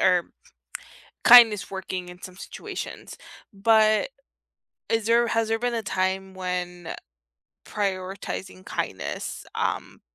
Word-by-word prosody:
or 180 -2 +3 0.9
kindness 225 -6 +8
working 185 -2 -5
in 180 0 -12
some 185 0 -9
situations, - - -7 0.4
but 215 - +4 0.8
is 225 -2 +1
there 235 +1 +4
has 225 -1 0
there 225 0 +1
been 245 0 -1
a 225 -1 -2
time 190 0 -1
when, 180 -2 -4
uh, - - -4 0.7
prioritizing 185 - -4
kindness, - - -4
um, - - -2
195 Hz, 110 wpm, -25 LUFS, 180-225 Hz, 0.9 s, kindness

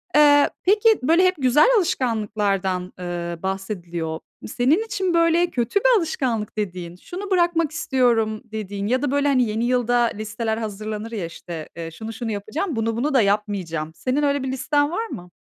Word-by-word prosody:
Eee, 290 -1 +6
peki, 420 +4 +4
böyle, 330 +7 +4
hep 370 - +3
güzel 265 - +4
alışkanlıklardan, 205 - -1
ııı, 175 -1 -5
bahsediliyor. 175 -4 -4 0.3
Senin 265 - +2
için, 380 -5 -1
böyle, 335 +1 +3
kötü 245 - 0
bir - - +4
alışkanlık 250 - -2
dediğin, 180 -4 -4
şunu 380 - -8
bırakmak 345 -4 +2
istiyorum 240 -8 +1
dediğin 205 -2 -5
ya 255 +3 +1
da, 290 - 0
böyle, 285 0 +2
hani, 265 -3 +3
yeni 225 0 -1
yılda 245 -1 +1 0.2
listeler 220 +1 -3
hazırlanır, 215 0 -5
ya, 210 -7 -3
işte, 165 -1 -8
eee, 165 -1 -6
"Şunu, 220 +7 -7
şunu 225 0 -4
yapacağım, 250 - -3
bunu, 225 0 -1
bunu 285 +5 0
da 260 - +5
yapmayacağım." 195 -6 -1
Senin 265 +8 -1
öyle 285 -1 +1
bir 265 - -2
listen 290 +3 +1
var 445 +6 -2
mı? 180 - -9
230 Hz, 165 wpm, -22 LUFS, 200-290 Hz, 0.3 s, Eee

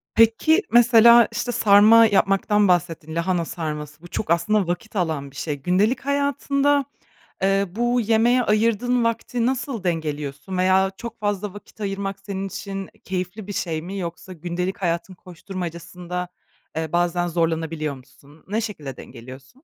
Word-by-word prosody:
Peki, 230 - +4
mesela, 235 0 +7
işte, 245 0 -3
sarma 215 +2 +6
yapmaktan 205 0 +2
bahsettin, 165 -3 0
lahana 170 0 0
sarması. 150 -1 -6
Bu 175 - -11
çok 170 0 -4
aslında 195 +2 +2
vakit 210 +5 -4
alan 155 -6 -2
bir - - -20
şey. 150 0 -3
Gündelik 195 - +1
hayatında, 280 0 +1 0.6
eee, 195 +1 +2
bu 240 +4 0
yemeğe 230 +3 +3
ayırdığın 230 +3 +1
vakti 230 +1 -1
nasıl 255 -5 -2
dengeliyorsun 150 0 -3
veya 190 +1 +3
çok 235 -1 -8
fazla 205 -1 -2
vakit 205 +1 -14
ayırmak 195 -1 -3
senin 195 0 -5
için 195 0 -6 0.2
keyifli 185 +2 -4
bir 205 - -5
şey 160 -4 -3
mi? 195 +3 -6
Yoksa 175 +1 -6
gündelik 180 +3 -4
hayatın 170 0 -2
koşturmacasında, 180 0 -7 0.5
eee, 160 -1 -3
bazen 175 0 +1
zorlanabiliyor 160 -3 -1
musun? 140 +3 -19
Ne 215 +3 0
şekilde 155 - -6
dengeliyorsun? 130 +3 -12
190 Hz, 140 wpm, -22 LUFS, 170-225 Hz, 0.6 s, mesela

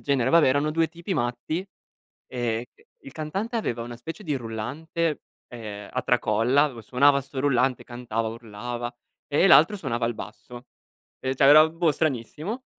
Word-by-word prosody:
genere, 130 -3 +1
vabbè, 165 -4 +6
erano 145 +3 +2
2 165 +1 +1
tipi 170 +3 -5
matti, 125 +6 -2 0.7
ehm, 120 -2 -1
c - - -27 0.2
il 135 - -10
cantante 195 - -3
aveva 120 - -2
una 120 0 -7
specie 165 - -8
di 150 -4 -1
rullante, 140 +8 -3 0.3
ehm, 105 -4 -8
a 125 - -1
tracolla, 125 +4 +2
avev 130 -6 -4
suonava 140 +5 +3
'sto 135 0 -6
rullante, 130 -2 +1
cantava, 115 -2 -3
urlava, 120 +2 -6 0.3
e 150 +6 +3
l'altro 185 +3 +6
suonava 120 -10 -2
il 120 - -2
basso, 120 +3 -10 0.5
e 130 0 -1
cioè, 135 - +2
era, 155 +3 +8
boh, 165 -1 +1
stranissimo 155 - -3
130 Hz, 160 wpm, -25 LUFS, 120-155 Hz, 0.7 s, era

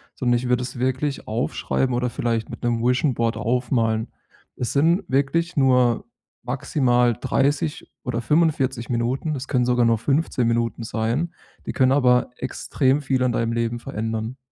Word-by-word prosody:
sondern 120 -2 +1
ich 125 +1 -3
würde 125 0 +2
es 125 0 -7
wirklich 130 +3 -1
aufschreiben 125 +3 -1
oder 125 +1 0
vielleicht 115 -2 -2
mit - - -9
'nem 120 -1 0
Vision 125 +3 +2
Board 115 -1 -1
aufmalen. 115 -1 0 0.5
Es 125 - -3
sind 165 +6 +3
wirklich 165 +6 0
nur 125 -4 +3 0.4
maximal 125 -1 +1
30 145 +3 0
oder 125 -3 -2
45 135 -3 +1
Minuten, 125 +6 -1
das 135 -2 -5
können 125 -3 +1
sogar 125 -1 +3
nur 115 -1 +3
15 135 0 0
Minuten 115 0 0
sein, 115 +10 -1 0.3
die - - -4
können 130 -1 +3
aber 125 -3 +3
extrem 130 +2 0
viel 130 -2 0
an 125 -1 +2
deinem 115 0 0
Leben 115 0 -1
verändern. 115 0 -4
125 Hz, 155 wpm, -23 LUFS, 115-135 Hz, 0.5 s, sind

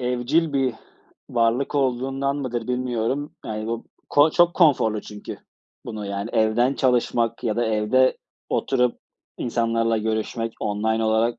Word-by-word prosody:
evcil 125 +6 +1
bir 130 -4 +1 0.6
varlık 120 +4 +1
olduğundan 135 +1 0
mıdır, 125 -4 -3
bilmiyorum. 125 +3 -1
Yani 110 0 -4
bu 115 0 -3 0.2
ko 145 +2 +5
çok 175 +1 +4
konforlu 120 - +3
çünkü 105 0 -8 0.5
bunu, 105 -2 -6
yani 100 +2 -4
evden 115 +4 +2
çalışmak 120 -3 +1
ya 110 -3 0
da 120 - +1
evde 110 +4 +2 0.3
oturup 125 -2 +1 0.4
insanlarla 115 -1 0
görüşmek 110 +1 -2
online 110 +2 0
olarak. 110 +2 +1
120 Hz, 125 wpm, -23 LUFS, 110-130 Hz, 0.6 s, ko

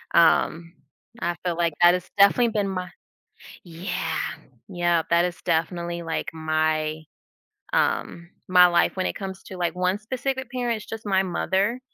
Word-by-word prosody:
Um, 165 0 +3 0.5
I 175 - -1
feel 175 -2 0
like 170 -2 +1
that 175 0 +8
has 180 0 -3
definitely 215 +4 +5
been 205 -3 -1
my 185 -2 -4 0.8
yeah, 175 +2 -3 0.5
yeah, 175 -3 +1
that 170 +1 +4
is 180 0 -2
definitely 170 +1 -1
like 165 -1 -3
my 155 -1 -1 0.7
um, 170 +1 0 0.2
my 180 -1 +7
life 175 +2 +2
when 185 - 0
it - - -2
comes 190 -1 -7
to 185 - -9
like 175 0 -1
one 185 +2 0
specific 260 +3 -4
parent. 245 -2 -1
It's 210 - -12
just 220 -1 -7
my 190 -1 +3
mother. 195 +6 0
180 Hz, 155 wpm, -24 LUFS, 170-195 Hz, 0.8 s, that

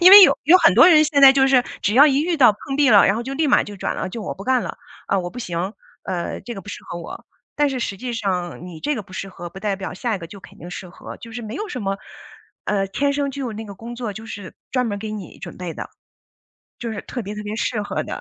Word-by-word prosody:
因 355 +2 +9
为 405 - +13
有 - - +6
有 335 +5 +8
很 - - +6
多 - - +8
人 310 -4 +7
现 295 -2 +2
在 270 -1 +10
就 270 0 +4
是 255 -2 +5 0.2
只 205 - +1
要 280 +4 +8
一 280 -1 +3
遇 340 +1 0
到 250 -7 +6
碰 270 +6 -6
壁 290 -2 +4
了， 205 -3 +7
然 195 - +2
后 235 - -2
就 265 +3 -5
立 310 +2 +1
马 - - +5
就 205 - -9
转 - - -2
了， - - -3
就 220 +4 -6
我 - - -4
不 195 - -10
干 255 0 +2
了。 - - -6 0.3
呃， 195 - +2
我 175 -1 -5
不 245 - -9
行， 180 -3 -3 0.3
呃， 175 -2 -3
这 240 - -7
个 195 - -7
不 - - -14
适 - - -8
合 170 - -6
我。 165 - -9 0.3
但 295 -1 +3
是 265 -2 -3
实 200 -3 -3
际 245 +4 -5
上 180 -6 -3
你 175 -3 -9
这 295 - 0
个 220 - -4
不 185 -1 -18
适 195 - -5
合， 175 -2 -8
不 190 - -10
代 200 0 -1
表 190 0 -6
下 225 +4 -2
一 - - -3
个 170 - -8
就 200 - -11
肯 - - -15
定 175 - -9
适 180 0 -7
合， 175 - -10
就 230 - -12
是 240 +1 -6
没 220 +1 -6
有 425 +8 -4
什 250 - -5
么， 195 0 -1 0.7
呃， 195 -2 0
天 280 +9 0
生 280 0 -1
就 275 0 -5
有 240 - -4
那 220 +1 -6
个 200 -2 -9
工 230 +5 -8
作， 235 -4 -4
就 220 +3 -9
是 205 -5 -8 0.2
专 255 -1 0
门 205 -3 -2
儿 - - -6
给 215 +1 -5
你 210 -4 -8
准 - - -9
备 175 -3 -6
的， - - -7 0.9
就 235 -1 -4
是 205 - -5
特 245 - -6
别 210 0 -6
特 210 - -6
别 210 +1 -4
适 225 -1 -1
合 205 - -3
的。 - - -6
220 Hz, 325 characters per minute, -21 LUFS, 195-265 Hz, 0.9 s, 为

